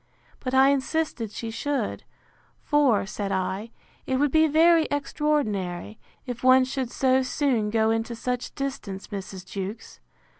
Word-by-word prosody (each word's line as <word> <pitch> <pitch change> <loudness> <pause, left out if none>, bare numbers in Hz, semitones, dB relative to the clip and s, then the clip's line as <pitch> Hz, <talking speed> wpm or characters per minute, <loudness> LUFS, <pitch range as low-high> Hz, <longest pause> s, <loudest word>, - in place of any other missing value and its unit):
But 255 0 -3
I 265 +1 +6
insisted 280 -4 -1
she 225 +2 -6
should: 265 0 -2 0.6
For, 280 -10 +3
said 200 0 -4
I, 190 +4 -2 0.4
it 260 - 0
would 285 +1 +2
be 315 +1 +5
very 325 +1 +5
extraordinary, 220 - -1 0.3
if 245 -2 -6
one 255 0 +6
should 260 -1 -3
so 260 +1 +2
soon 255 -5 0
go 220 0 +2
into 225 +1 -1
such 250 +1 -3
distance, 265 -9 -5
Mrs. 190 -2 -7
Jewkes. 195 +3 -6
255 Hz, 140 wpm, -25 LUFS, 210-280 Hz, 0.6 s, I